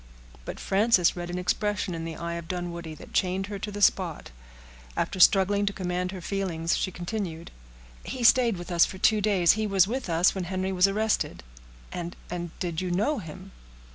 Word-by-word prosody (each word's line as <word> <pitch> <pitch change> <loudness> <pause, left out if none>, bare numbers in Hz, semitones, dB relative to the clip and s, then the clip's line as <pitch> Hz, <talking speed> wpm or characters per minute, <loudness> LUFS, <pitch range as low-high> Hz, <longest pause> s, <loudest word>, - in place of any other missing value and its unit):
But - - -6
Frances 195 -3 +3
read 175 -1 -5
an 175 - -3
expression 205 +1 -1
in 165 -1 -4
the 165 -1 -5
eye 170 0 -4
of 170 -1 -6
Dunwoodie 170 -3 -5
that - - -13
chained 190 0 +1
her 200 0 -6
to 210 - -4
the 205 0 -3
spot. 175 - +1 0.7
After 190 - -1
struggling 200 +2 +5
to 200 - 0
command 180 -1 -2
her 190 -2 -7
feelings, 170 -4 -1
she 185 - -1
continued,— 175 -2 -5 0.5
"He 255 - -5
stayed 235 -3 +5
with 175 +1 -8
us 170 -1 +5
for 190 - -1
two 215 +2 +3
days—he 205 +1 +3
was 195 -2 +4
with 250 -2 -3
us 170 +2 +3
when 190 -2 -3
Henry 185 +1 -2
was 185 0 +4
arrested." 215 - -1 0.5
"And—and—did 175 -1 -5
you 185 - -2
know 215 +11 +1
him?" 185 +2 -10
185 Hz, 180 wpm, -27 LUFS, 175-200 Hz, 0.7 s, struggling